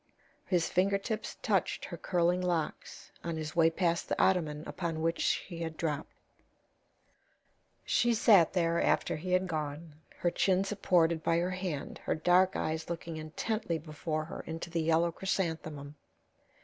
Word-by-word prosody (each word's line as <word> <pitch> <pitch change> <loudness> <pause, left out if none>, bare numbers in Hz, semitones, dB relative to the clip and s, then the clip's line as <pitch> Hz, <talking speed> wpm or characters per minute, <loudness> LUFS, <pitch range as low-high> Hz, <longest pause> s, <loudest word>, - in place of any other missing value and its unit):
His 175 -3 +2
finger 195 +2 +2
tips 215 +2 -4
touched - - 0
her - - -6
curling 175 0 +1
locks 175 -4 -3
on 170 -1 -3
his 155 +1 -5
way 165 -1 +5
past 170 0 0
the - - -1
ottoman 155 -5 +2
upon 165 -3 -3
which 165 +1 0
she 170 -2 -1
had 160 -1 -4
dropped. 150 -3 -2 1.7
She 240 -1 +3
sat 205 -7 +5
there 170 -2 +2
after - - +2
he 180 +4 -3
had 185 +1 +3
gone, 155 -1 -4 0.2
her 175 - +1
chin 190 +1 +2
supported 175 -5 +2
by 165 - +2
her 175 +2 0
hand, 185 -6 -4
her - - -1
dark 180 +3 +4
eyes 160 +1 -2
looking 170 -1 -5
intently 165 +4 -2
before 155 0 -4
her 165 - -7
into 165 +1 -5
the 165 -1 0
yellow 165 +1 +2
chrysanthemum. 160 -6 -3
170 Hz, 150 wpm, -31 LUFS, 160-185 Hz, 1.7 s, way